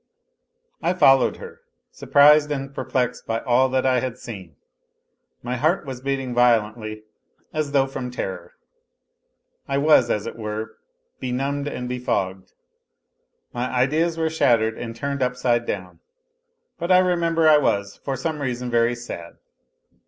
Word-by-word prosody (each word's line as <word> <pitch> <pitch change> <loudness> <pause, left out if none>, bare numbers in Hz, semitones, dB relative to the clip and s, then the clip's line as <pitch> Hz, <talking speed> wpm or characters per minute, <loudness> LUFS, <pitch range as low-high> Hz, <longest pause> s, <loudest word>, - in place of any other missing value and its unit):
I 180 - 0
followed 135 -7 +4
her, - - -11 0.3
surprised 150 +1 +5
and 135 -1 -4
perplexed 125 -3 -2
by 115 0 -1
all 130 +1 +3
that 130 0 0
I 130 -1 +3
had 125 -1 -4
seen. 95 - -9 0.9
My 125 +1 -3
heart 155 +6 +1
was 130 -2 -7
beating 135 -2 -2
violently, 110 -3 +1 0.5
as 155 -2 -2
though 140 -1 +3
from 135 -2 -5
terror. 95 -7 -6 1.1
I 140 - -1
was, 140 -4 +4
as 105 -2 -1
it - - -6
were, 110 0 -5 0.4
benumbed 135 +3 -2
and 125 -3 -4
befogged; 100 -7 -3 1.0
my 125 +1 -2
ideas 155 +7 +1
were 160 -1 0
shattered 115 -7 +2
and 115 -1 -7
turned 140 +3 -3
upside 125 -2 0
down; 90 -2 -5 0.8
but 170 +2 -2
I 180 - +7
remember 170 -3 +2
I 150 -1 +7
was, 100 -7 -1
for 135 - -2
some 150 +3 -3
n 135 - -1
;i><>n, 125 0 -4
very 120 +1 +2
sad. 100 -8 -9
125 Hz, 145 wpm, -23 LUFS, 115-140 Hz, 1.1 s, I